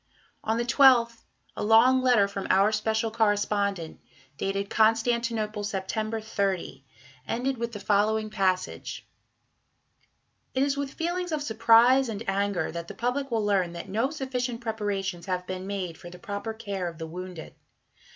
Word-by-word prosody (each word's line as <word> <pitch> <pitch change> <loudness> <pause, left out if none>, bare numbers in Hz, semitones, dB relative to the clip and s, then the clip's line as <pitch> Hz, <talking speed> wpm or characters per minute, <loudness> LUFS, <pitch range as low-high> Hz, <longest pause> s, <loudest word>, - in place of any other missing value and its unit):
On 220 +1 0
the 235 - 0
12th 240 -3 +4 0.3
a - - -3
long 230 +5 +5
letter 245 -6 +4
from 200 -1 -5
"Our 195 +3 +4
Special 220 +1 0
Correspondent," 205 -5 0 0.4
dated 195 +4 -2
"Constantinople, 225 -1 +1
September 215 +3 -2
30," 195 -9 -2 0.4
ended 255 +1 -1
with 235 0 -3
the 205 - -6
following 215 +1 +1
passage: 185 -3 -2 1.5
It 260 - +3
is 280 0 +1
with 280 -1 -4
feelings 350 +1 -2
of 305 -2 -1
surprise 230 +2 +5
and 220 0 -5
anger 195 -3 0
that 170 0 -6
the - - -9
public 255 +4 -1
will 225 -3 0
learn 190 -4 +1
that 170 - -7
no 225 +7 0
sufficient 255 -5 -3
preparations 200 -6 -3
have 180 -1 -2
been 185 +1 -5
made 185 -4 -4
for 175 - -10
the 180 - -11
proper 205 +1 -5
care 200 -5 -4
of 165 -2 -7
the 160 - -5
wounded. 180 0 -8
215 Hz, 150 wpm, -27 LUFS, 195-235 Hz, 1.5 s, long